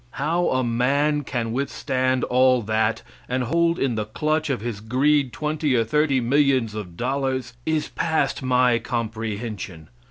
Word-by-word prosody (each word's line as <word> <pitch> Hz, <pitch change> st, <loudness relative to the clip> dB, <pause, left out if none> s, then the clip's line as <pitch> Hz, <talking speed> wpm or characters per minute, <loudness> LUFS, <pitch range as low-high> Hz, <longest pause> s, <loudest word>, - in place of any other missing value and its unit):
How 165 Hz, +5 st, +1 dB
a 130 Hz, 0 st, +1 dB
man 140 Hz, +5 st, +1 dB
can 120 Hz, -4 st, -3 dB
withstand 130 Hz, -1 st, -1 dB
all 125 Hz, -1 st, +3 dB
that, 110 Hz, +1 st, 0 dB, 0.3 s
and 125 Hz, 0 st, 0 dB
hold 170 Hz, +6 st, +1 dB
in 130 Hz, -3 st, 0 dB
the 110 Hz, -1 st, -2 dB
clutch 155 Hz, +8 st, -1 dB
of 135 Hz, -, 0 dB
his 115 Hz, -3 st, -4 dB
greed 135 Hz, +4 st, +2 dB
twenty 150 Hz, -1 st, -1 dB
or 115 Hz, -, +3 dB
thirty 140 Hz, +3 st, +2 dB
millions 130 Hz, -2 st, +2 dB
of 90 Hz, -6 st, -7 dB
dollars, 130 Hz, -1 st, -2 dB
is 155 Hz, -1 st, 0 dB
past 160 Hz, -5 st, 0 dB
my 125 Hz, -2 st, +3 dB
comprehension. 110 Hz, -8 st, -4 dB
130 Hz, 150 wpm, -23 LUFS, 115-145 Hz, 0.3 s, all